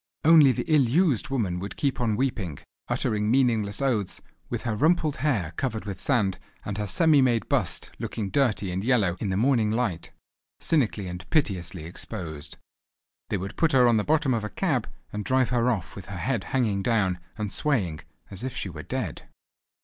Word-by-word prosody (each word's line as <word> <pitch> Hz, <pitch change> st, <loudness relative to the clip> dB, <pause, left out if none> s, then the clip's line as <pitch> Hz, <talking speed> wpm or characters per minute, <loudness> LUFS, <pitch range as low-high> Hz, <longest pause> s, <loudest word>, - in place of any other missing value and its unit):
Only 155 Hz, -4 st, +8 dB
the -, -, -2 dB
ill 145 Hz, -6 st, +4 dB
used 155 Hz, -, +2 dB
woman 105 Hz, -10 st, -1 dB
would 100 Hz, +2 st, -6 dB
keep 135 Hz, -3 st, -1 dB
on 110 Hz, -3 st, +1 dB
weeping, 105 Hz, -, -2 dB, 0.3 s
uttering 105 Hz, 0 st, 0 dB
meaningless 115 Hz, -3 st, +2 dB
oaths, 110 Hz, -8 st, 0 dB, 0.3 s
with -, -, -3 dB
her 115 Hz, -3 st, -1 dB
rumpled 155 Hz, +3 st, +2 dB
hair 115 Hz, -, 0 dB
covered 110 Hz, -5 st, -2 dB
with 100 Hz, -4 st, -6 dB
sand, 100 Hz, -9 st, +1 dB, 0.3 s
and 105 Hz, 0 st, -4 dB
her 105 Hz, -, -2 dB
semi 145 Hz, -, +4 dB
made 120 Hz, -5 st, +2 dB
bust -, -, -1 dB
looking 100 Hz, -3 st, -4 dB
dirty 110 Hz, -7 st, +1 dB
and 95 Hz, +2 st, -2 dB
yellow 110 Hz, -8 st, +2 dB
in 105 Hz, -, -2 dB
the 95 Hz, -, 0 dB
morning 115 Hz, -2 st, +3 dB
light, 110 Hz, -7 st, -1 dB, 0.5 s
cynically 120 Hz, -10 st, +1 dB
and 90 Hz, 0 st, -7 dB
piteously 90 Hz, -, 0 dB
exposed. 80 Hz, -4 st, -6 dB, 0.7 s
They 105 Hz, -, 0 dB
would 95 Hz, +1 st, -6 dB
put 165 Hz, -2 st, +2 dB
her 125 Hz, -2 st, +6 dB
on 115 Hz, -2 st, +4 dB
the 105 Hz, -, +1 dB
bottom 150 Hz, -2 st, +2 dB
of 115 Hz, -2 st, -1 dB
a 105 Hz, -, -3 dB
cab 135 Hz, -, -1 dB, 0.2 s
and 105 Hz, 0 st, -3 dB
drive 130 Hz, +1 st, +2 dB
her 125 Hz, 0 st, +2 dB
off 105 Hz, -9 st, -2 dB
with 95 Hz, -3 st, -9 dB
her 100 Hz, -, -6 dB
head 115 Hz, 0 st, -1 dB
hanging 110 Hz, -7 st, 0 dB
down, 95 Hz, -5 st, +1 dB, 0.2 s
and 105 Hz, -2 st, -3 dB
swaying, 100 Hz, -, 0 dB, 0.3 s
as 95 Hz, +3 st, -5 dB
if 130 Hz, -, -4 dB
she 95 Hz, -, -3 dB
were 75 Hz, -3 st, -7 dB
dead. -, -, -5 dB
110 Hz, 190 wpm, -26 LUFS, 95-130 Hz, 0.7 s, Only